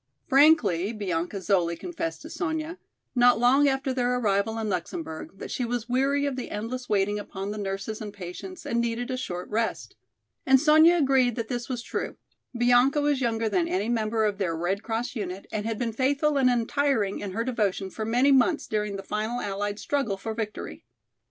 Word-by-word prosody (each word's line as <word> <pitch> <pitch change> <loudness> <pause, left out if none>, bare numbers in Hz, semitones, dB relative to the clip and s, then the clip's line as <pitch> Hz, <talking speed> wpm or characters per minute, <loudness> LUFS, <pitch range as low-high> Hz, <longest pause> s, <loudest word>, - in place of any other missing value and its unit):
Frankly 245 - +4
Bianca 185 -3 -2
Zoli 175 -2 +1
confessed 330 - -5
to - - -9
Sonya, 320 0 -3 0.3
not 245 -1 +5
long 260 +5 +4
after 270 -1 0
their 250 -1 +1
arrival 215 -1 +1
in 220 -1 -2
Luxemburg, 165 -4 -4
that - - -8
she 250 - -2
was 240 -1 -2
weary 275 +3 +1
of 280 -2 -1
the 255 - -5
endless 240 +4 -5
waiting 205 0 +1
upon 200 0 -5
the 210 - -5
nurses 195 +2 -4
and 210 -1 -5
patients 200 - -8
and 235 0 0
needed 235 +2 -2
a - - -1
short 180 -8 -5
rest. 225 +1 -2 0.5
And 265 0 +5
Sonya 315 +4 +6
agreed 265 -5 +3
that 230 -2 -4
this 245 0 -3
was 245 -2 -3
true. - - -4 0.4
Bianca 245 +4 +4
was 290 -2 +1
younger 230 -2 0
than 335 - +1
any 340 - -1
member 220 -1 +1
of 205 -1 -1
their 170 -4 -1
Red 185 +4 -1
Cross 230 +3 -3
unit 195 -3 -5
and 215 0 -2
had 225 -1 -2
been 230 -1 -2
faithful 285 +5 +1
and 265 -2 +4
untiring 245 -3 +1
in 195 -2 -5
her 230 - -1
devotion 205 -6 -1
for 220 - -5
many 245 +5 +3
months 275 +5 +3
during 210 -1 -2
the 195 - -6
final 215 +4 -2
allied 205 0 -3
struggle 235 -6 -1
for 220 +3 -4
victory. 220 -1 -5
230 Hz, 190 wpm, -26 LUFS, 205-265 Hz, 0.5 s, Sonya